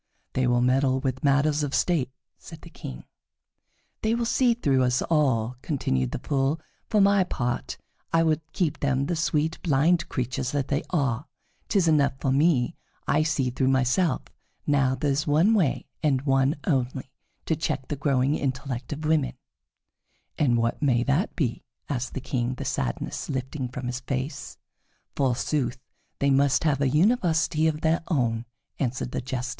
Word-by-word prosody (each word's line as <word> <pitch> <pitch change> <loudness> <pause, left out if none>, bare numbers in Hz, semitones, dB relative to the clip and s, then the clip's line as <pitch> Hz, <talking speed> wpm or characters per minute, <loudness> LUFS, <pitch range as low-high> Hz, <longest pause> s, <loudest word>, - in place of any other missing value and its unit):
"They 130 -1 +1
will 120 0 +3
meddle 130 +1 +2
with 130 -1 -3
matters 145 +1 +3
of 145 -1 -1
state," 160 -8 +1 0.3
said - - -11
the - - -13
King. 60 -1 -8 1.0
"They 220 +1 +1
will 235 0 -1
see 240 0 +3
through 140 - +2
us 125 0 +2
all," 125 -7 +1
continued 65 - -1
the - - -4
Fool. 140 +3 0 0.3
"For 215 - +3
my 200 -1 +5
part, 120 - -3 0.3
I 165 0 +4
would 160 -1 +1
keep 170 -6 -1
them 135 -1 +1
the 175 - -1
sweet, 160 0 0
blind 165 +3 +2
creatures 125 +1 -2
that 140 -2 -1
they 145 +2 +1
are. 140 -4 0 0.4
'Tis 190 -5 +2
enough 145 -3 +3
for 135 - 0
me 140 0 +2 0.3
that - - +1
I - - +4
see 140 -5 0
through 130 +1 0
myself. 130 +7 +2 0.4
Now 135 -3 +2
there 140 +2 0
is 140 +3 -1
one 160 +9 +4
way, 180 -11 +1 0.2
and 140 -4 +1
one 135 +1 +2
only, 130 -3 -1 0.3
to 160 - +1
check 145 -4 -2
the 145 - -2
growing 135 0 +1
intellect 130 -3 -3
of 150 +1 -4
women." 155 -3 +2 1.0
"And 125 -6 +2
what 115 0 0
may 125 -5 +3
that 140 - 0
be?" 125 -8 -1 0.3
asked 130 -2 -3
the 135 - -3
King, 125 -1 -2
the - - -6
sadness - - -3
lifting 130 0 -3
from 130 +1 -6
his 125 0 -3
face. 135 +2 -4 0.6
"Forsooth, 130 -1 0 0.4
they 140 0 +2
must 135 0 +3
have 145 -4 +1
a 135 - +3
university 160 - +2
of 155 -1 -1
their 160 +1 +2
own," 120 -7 0 0.3
answered 125 -1 -2
the - - -2
Jester. 125 -1 -3
140 Hz, 170 wpm, -26 LUFS, 130-155 Hz, 1.0 s, my